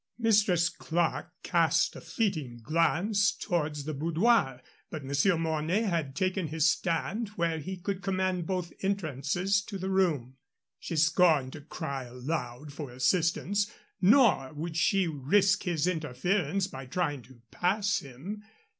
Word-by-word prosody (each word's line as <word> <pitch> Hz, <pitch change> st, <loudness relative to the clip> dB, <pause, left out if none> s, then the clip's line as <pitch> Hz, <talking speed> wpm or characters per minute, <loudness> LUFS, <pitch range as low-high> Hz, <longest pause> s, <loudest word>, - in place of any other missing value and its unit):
Mistress 210 Hz, -7 st, +3 dB
Clerke 170 Hz, 0 st, -1 dB
cast 165 Hz, -4 st, +2 dB
a -, -, -9 dB
fleeting 155 Hz, -, -2 dB
glance 175 Hz, -, +2 dB
towards 150 Hz, -4 st, -2 dB
the 155 Hz, +2 st, -4 dB
boudoir, 165 Hz, -, +2 dB, 0.3 s
but 155 Hz, -3 st, -6 dB
Monsieur 145 Hz, +7 st, +2 dB
Mornay 160 Hz, +5 st, 0 dB
had 165 Hz, -9 st, -1 dB
taken 185 Hz, +1 st, 0 dB
his 160 Hz, +1 st, +1 dB
stand 175 Hz, +7 st, 0 dB
where 165 Hz, -2 st, 0 dB
he 185 Hz, +5 st, -5 dB
could 195 Hz, +1 st, -4 dB
command 185 Hz, -3 st, -1 dB
both 180 Hz, -3 st, -3 dB
entrances 185 Hz, +1 st, 0 dB
to 200 Hz, 0 st, -7 dB
the 190 Hz, +1 st, -3 dB
room. 150 Hz, -10 st, +1 dB, 0.4 s
She 165 Hz, -, -5 dB
scorned 160 Hz, -4 st, +3 dB
to 155 Hz, -, -8 dB
cry 140 Hz, -3 st, -5 dB
aloud 125 Hz, +2 st, -5 dB
for 145 Hz, -2 st, -6 dB
assistance, 170 Hz, +10 st, +1 dB, 0.3 s
nor 200 Hz, -, +5 dB
would 160 Hz, +2 st, -5 dB
she 190 Hz, +2 st, +2 dB
risk 190 Hz, +8 st, +2 dB
his 170 Hz, -4 st, 0 dB
interference 175 Hz, +3 st, 0 dB
by 135 Hz, -8 st, -8 dB
trying 145 Hz, -2 st, -1 dB
to 125 Hz, +1 st, -18 dB
pass 200 Hz, +3 st, +1 dB
him. 145 Hz, +11 st, -8 dB
165 Hz, 135 wpm, -29 LUFS, 145-190 Hz, 0.4 s, nor